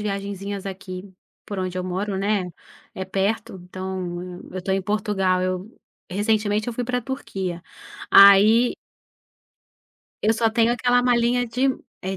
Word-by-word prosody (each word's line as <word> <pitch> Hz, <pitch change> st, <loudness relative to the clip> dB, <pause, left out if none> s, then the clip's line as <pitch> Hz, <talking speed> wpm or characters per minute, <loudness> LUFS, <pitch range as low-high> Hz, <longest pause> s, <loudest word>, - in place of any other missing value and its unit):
viagenzinhas 200 Hz, -1 st, -4 dB
aqui, 190 Hz, 0 st, -7 dB, 0.4 s
por 205 Hz, -, -5 dB
onde 185 Hz, 0 st, -3 dB
eu 180 Hz, -, -3 dB
moro, 190 Hz, +2 st, -2 dB
né. 195 Hz, -2 st, 0 dB, 0.4 s
É 190 Hz, -, -5 dB
perto, 195 Hz, +1 st, -2 dB
então, 185 Hz, 0 st, -5 dB
eu 180 Hz, 0 st, -9 dB
eu 185 Hz, -, -5 dB
estou 190 Hz, +1 st, -1 dB
em 195 Hz, -, -1 dB
Portugal, 195 Hz, -2 st, 0 dB
eu 185 Hz, +3 st, -2 dB, 0.4 s
recentemente 210 Hz, +2 st, 0 dB
eu 240 Hz, -, -2 dB
fui 245 Hz, -, -3 dB
pra 250 Hz, +1 st, -1 dB
Turquia, 190 Hz, -9 st, -5 dB, 0.5 s
aí 210 Hz, +5 st, +7 dB, 1.5 s
Eu 220 Hz, +2 st, +3 dB
só 225 Hz, 0 st, +2 dB
tenho 230 Hz, +1 st, +3 dB
aquela 245 Hz, 0 st, +2 dB
malinha 245 Hz, 0 st, +2 dB
de 250 Hz, +4 st, +1 dB, 0.3 s
é 190 Hz, +1 st, -3 dB
200 Hz, 145 wpm, -23 LUFS, 185-225 Hz, 1.5 s, aí